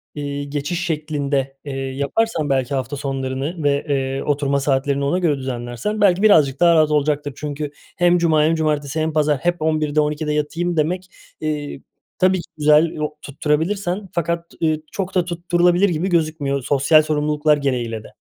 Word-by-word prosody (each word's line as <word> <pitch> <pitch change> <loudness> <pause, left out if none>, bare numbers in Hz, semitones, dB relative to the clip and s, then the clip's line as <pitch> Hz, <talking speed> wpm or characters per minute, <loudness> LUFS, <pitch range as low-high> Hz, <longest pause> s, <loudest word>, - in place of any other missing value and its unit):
eee, 145 -1 -4
geçiş 145 +5 -3
şeklinde, 145 -4 -2
eee, 140 - -5
yaparsan 140 +6 -1
belki 135 +1 0
hafta 130 +1 -3
sonlarını 135 +4 -3
ve, 140 +1 +1
eee, 135 -1 -1
oturma 140 -1 0
saatlerini 140 0 0
ona 175 +6 +1
göre 160 -6 +1
düzenlersen 130 - -4
belki 195 -2 +4
birazcık 150 -10 +5
daha 170 -1 +5
rahat 155 -1 +4
olacaktır. 145 -1 0
Çünkü 150 0 -4 0.3
hem 175 0 +4
cuma 160 -3 +3
hem 160 +2 +3
cumartesi 150 -1 -1
hem 155 0 -1
pazar 150 -2 +2
hep 175 +2 -1
11'de 155 -1 +1
12'de 150 0 -1
yatayım 165 +3 -1
demek, 180 +4 -1 0.3
eee, 150 -3 -3 0.4
tabii 185 0 +4
ki 170 - -10
güzel, 150 +1 +5
yok, 150 0 -4
tutturabilirsen. 175 +7 -1
Fakat, 170 0 -1 0.2
eee, 155 -1 +1
çok 195 -1 -4
da 180 -2 +2
tutturulabilir 175 +2 +2
gibi 175 +3 -1
gözükmüyor. 155 -5 0
Sosyal 145 +4 +4
sorumluluklar 150 0 +1
gereğiyle 120 -6 -2
de. - - -12
150 Hz, 160 wpm, -20 LUFS, 140-170 Hz, 0.4 s, birazcık